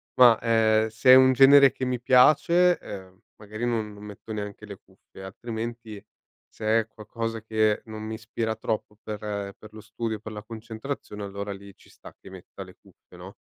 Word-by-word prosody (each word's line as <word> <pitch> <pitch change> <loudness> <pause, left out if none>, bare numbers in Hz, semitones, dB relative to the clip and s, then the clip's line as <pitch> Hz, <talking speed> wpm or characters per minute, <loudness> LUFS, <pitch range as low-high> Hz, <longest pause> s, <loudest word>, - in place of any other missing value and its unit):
ma, 120 -3 +6
ehm, 110 -1 +2
se 110 +4 +3
è - - +11
un 130 0 +6
genere 140 +1 +7
che 130 - -5
mi 125 -1 -3
piace, 155 +8 +4
ehm, 95 -2 -10 0.2
magari 110 +3 -6
non 110 -3 -2
non 105 0 -13
metto 105 +1 -9
neanche 105 0 -7
le 100 -2 -10
cuffie, 95 0 -18
altrimenti 110 +1 -7 0.5
se 110 +1 +1
è 110 - -3
qualcosa 115 +1 -6
che 110 -1 0
non 110 -1 -8
mi 110 +1 -5
ispira 110 0 -4
troppo 110 -2 -4
per 105 -1 -6
per 105 0 -7
lo 110 - -11
studio, 110 +1 -5
per 110 +1 -9
la 105 -1 -7
concentrazione, 110 0 -8
allora 100 0 -6
lì 100 0 -12
ci - - -23
sta - - -15
che - - -14
metta - - -11
le - - -15
cuffie, - - -21
no? - - -11
110 Hz, 185 wpm, -25 LUFS, 105-115 Hz, 0.5 s, è